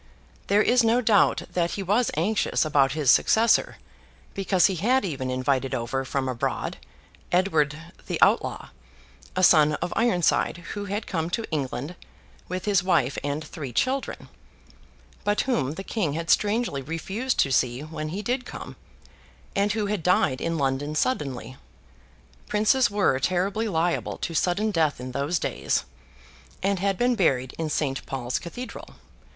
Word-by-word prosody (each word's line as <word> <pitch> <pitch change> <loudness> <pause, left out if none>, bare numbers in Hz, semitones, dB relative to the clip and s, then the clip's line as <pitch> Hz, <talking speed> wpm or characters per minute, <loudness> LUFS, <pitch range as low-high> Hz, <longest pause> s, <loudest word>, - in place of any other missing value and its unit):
There 205 +1 +4
is 245 -1 +4
no 230 +2 +3
doubt 220 -4 +3
that 175 -1 0
he 200 - -3
was 210 +6 +2
anxious 195 +1 +1
about 140 -3 +3
his 150 -5 +3
successor; 225 +1 +3 0.6
because 190 -2 +2
he 190 -3 +2
had 245 +7 +2
even 135 -7 -3
invited 130 +1 0
over, 125 +2 -2
from 135 0 -2
abroad, 125 -2 -2 0.5
Edward 160 -5 +2 0.3
the - - -2
Outlaw, - - +2 0.7
a 185 - 0
son 155 -4 +6
of 175 - -3
Ironside, 180 -7 +2 0.2
who 205 -1 -4
had 205 +2 -3
come 165 -3 -2
to 225 +5 -2
England 145 +2 -3 0.5
with 185 +1 -4
his 205 -1 +3
wife 155 -8 +1
and 145 +2 -2
three 150 -4 -7
children, 260 - -1 1.0
but 205 0 +1
whom 150 - 0
the 195 - -6
King 195 -9 -2
had 165 +2 -1
strangely 210 - +1
refused 190 - -3
to 135 - 0
see 125 0 +1
when 155 0 -5
he 195 +6 -4
did 250 +2 -1
come, - - -9 0.8
and 205 +1 +2
who 215 -1 -1
had 205 -2 -2
died 160 -6 +2
in 165 0 -1
London 140 +1 -1
suddenly 135 - -2 0.9
(princes 215 +4 +3
were 200 -10 +2
terribly 195 +8 0
liable 170 -3 -1
to 170 - -4
sudden 190 +6 +1
death 160 -8 +1
in 125 0 -6
those 140 +6 -1
days), - - -1 0.8
and 195 -1 +1
had 195 0 0
been 245 +3 +2
buried 130 - +1
in 160 -1 -1
St. 140 -3 -1
Paul's 125 -2 -2
Cathedral. 245 +9 -8
175 Hz, 155 wpm, -25 LUFS, 140-205 Hz, 1.0 s, son